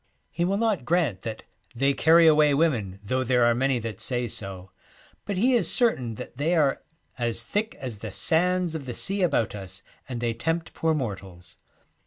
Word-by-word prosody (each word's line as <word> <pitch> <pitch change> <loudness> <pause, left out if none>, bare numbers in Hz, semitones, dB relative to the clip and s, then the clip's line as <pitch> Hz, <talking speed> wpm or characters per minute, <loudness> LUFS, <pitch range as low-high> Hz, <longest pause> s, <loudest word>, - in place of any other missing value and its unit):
He 170 - -1
will 195 +2 0
not 215 - 0
grant 150 - 0
that 110 -2 -6 0.3
'they 135 +3 +2
carry 165 +3 +5
away 150 -2 +5
women, 115 - 0
though 130 +5 -1
there 125 -1 +2
are 120 - +4
many 130 +2 +1
that 115 -4 -5
say 125 -1 -1
so,' 95 -3 -6 0.5
but 200 -2 -3
he 250 +7 +3
is 220 -9 +2
certain 130 - +1
that 120 - -9
they 160 +5 +1
are 145 -4 +2 0.2
' - - -45
as 115 -1 -1
thick 210 - -2
as 120 -6 -7
the 110 - -6
sands 180 - +1
of 150 -5 -6
the 120 - -4
sea 195 +1 0
about 145 -10 +1
us, 95 -1 -8 0.3
and 125 -2 -4
they 120 -1 -1
tempt 165 +8 -2
poor 160 -1 0
mortals.' 95 - -6
130 Hz, 195 wpm, -26 LUFS, 115-165 Hz, 0.5 s, carry